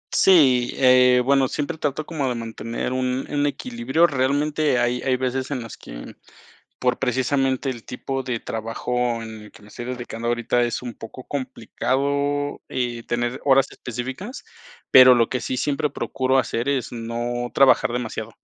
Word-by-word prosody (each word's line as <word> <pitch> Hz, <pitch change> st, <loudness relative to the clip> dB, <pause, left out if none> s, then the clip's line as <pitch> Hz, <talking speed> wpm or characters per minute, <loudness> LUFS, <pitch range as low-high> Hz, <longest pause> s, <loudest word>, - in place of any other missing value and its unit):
Sí, 130 Hz, -10 st, +5 dB
eh, 125 Hz, -1 st, +5 dB
bueno, 135 Hz, 0 st, +3 dB
siempre 150 Hz, +4 st, -4 dB
trato 145 Hz, +1 st, -2 dB
como 145 Hz, -5 st, -2 dB
de 125 Hz, -, -2 dB
mantener 115 Hz, +1 st, -4 dB
un 130 Hz, 0 st, -1 dB
un 145 Hz, 0 st, 0 dB
equilibrio, 235 Hz, -, 0 dB
realmente 145 Hz, 0 st, +1 dB
hay 120 Hz, 0 st, +1 dB
hay 130 Hz, -1 st, +1 dB
veces 130 Hz, +1 st, -2 dB
en 130 Hz, -4 st, -3 dB
las 115 Hz, -, -9 dB
que, -, -, -10 dB, 0.6 s
por 125 Hz, -1 st, 0 dB
precisamente 130 Hz, +1 st, 0 dB
el 120 Hz, -4 st, -5 dB
tipo 135 Hz, +1 st, -4 dB
de 125 Hz, -3 st, -3 dB
trabajo 115 Hz, +2 st, -2 dB
en 110 Hz, -1 st, -9 dB
el 105 Hz, -, -14 dB
que 115 Hz, -, -16 dB
me 105 Hz, -, -16 dB
estoy 120 Hz, +3 st, -8 dB
dedicando 120 Hz, -2 st, -5 dB
ahorita 120 Hz, +1 st, +1 dB
es 120 Hz, -1 st, -1 dB
un 120 Hz, -2 st, -7 dB
poco 120 Hz, +4 st, -10 dB
complicado, 140 Hz, +2 st, -2 dB
eh, 120 Hz, -2 st, -2 dB
tener 120 Hz, +2 st, -2 dB
horas 135 Hz, -1 st, +5 dB
específicas, 130 Hz, -, -6 dB, 0.5 s
pero 130 Hz, -1 st, +9 dB
lo 115 Hz, -2 st, +3 dB
que 125 Hz, -, -2 dB
sí 130 Hz, -, -2 dB
siempre 145 Hz, +1 st, 0 dB
procuro 130 Hz, -1 st, 0 dB
hacer 120 Hz, -2 st, -1 dB
es 135 Hz, -4 st, -2 dB
no 120 Hz, +1 st, -3 dB
trabajar 130 Hz, -3 st, +4 dB
demasiado, 115 Hz, -2 st, -4 dB
130 Hz, 165 wpm, -23 LUFS, 120-140 Hz, 0.6 s, pero